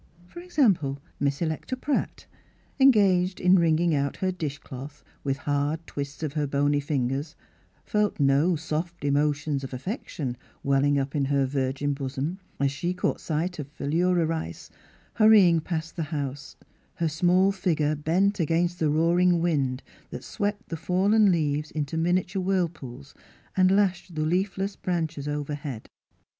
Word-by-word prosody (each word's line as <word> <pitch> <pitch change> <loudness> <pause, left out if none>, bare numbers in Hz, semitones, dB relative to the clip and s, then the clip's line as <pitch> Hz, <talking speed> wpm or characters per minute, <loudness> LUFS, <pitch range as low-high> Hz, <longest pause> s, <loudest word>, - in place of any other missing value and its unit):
For 265 - -11
example, 210 - +1 0.2
Miss 140 +3 0
Electa 160 +10 -3
Pratt, 285 +2 -2 0.5
en 270 0 +8
gaged 190 -5 +3
in 180 +1 +5
wringing 165 0 +3
out 140 -1 -1
her 190 -1 0
dish 155 -5 -4
cloth, 140 +2 -10 0.2
with 135 -1 -1
hard 145 +3 -1
twists 140 +1 -6
of 150 -3 -2
her 150 -2 -1
bony 145 +1 +1
fingers, 140 +2 -2 0.5
felt 210 -3 0
no 145 +5 +3
soft 160 +1 -4
emotions 145 0 +1
of 130 -1 -5
affection 140 - -4 0.3
welling 140 +1 +2
up 135 +2 -2
in 140 -2 +1
her 140 0 +2
virgin 135 +1 -1
bosom 140 +6 -4 0.2
as 140 0 +2
she 175 +6 -2
caught - - -1
sight 165 +2 -2
of 145 - -4
Philura 165 +5 +1
Rice 155 - -4 0.4
hurrying 210 -7 +6
past 160 0 -4
the 170 - -3
house, 145 -2 -4 0.4
her 165 - 0
small 180 +5 +3
figure 160 -6 0
bent 180 +7 +1
against 170 +2 +1
the 155 - +2
roaring 170 +3 +3
wind 140 -6 0 0.3
that - - -7
swept 205 +1 -3
the 165 - -3
fallen 195 +5 +3
leaves 150 -2 0
into 150 0 -3
miniature 180 +3 0
whirlpools, 160 -8 -3 0.4
and 185 -1 +4
lashed 190 -3 +1
the 155 0 0
leafless 195 +3 -1
branches 160 -5 -3
overhead. 145 -4 -4
160 Hz, 150 wpm, -26 LUFS, 145-180 Hz, 0.5 s, en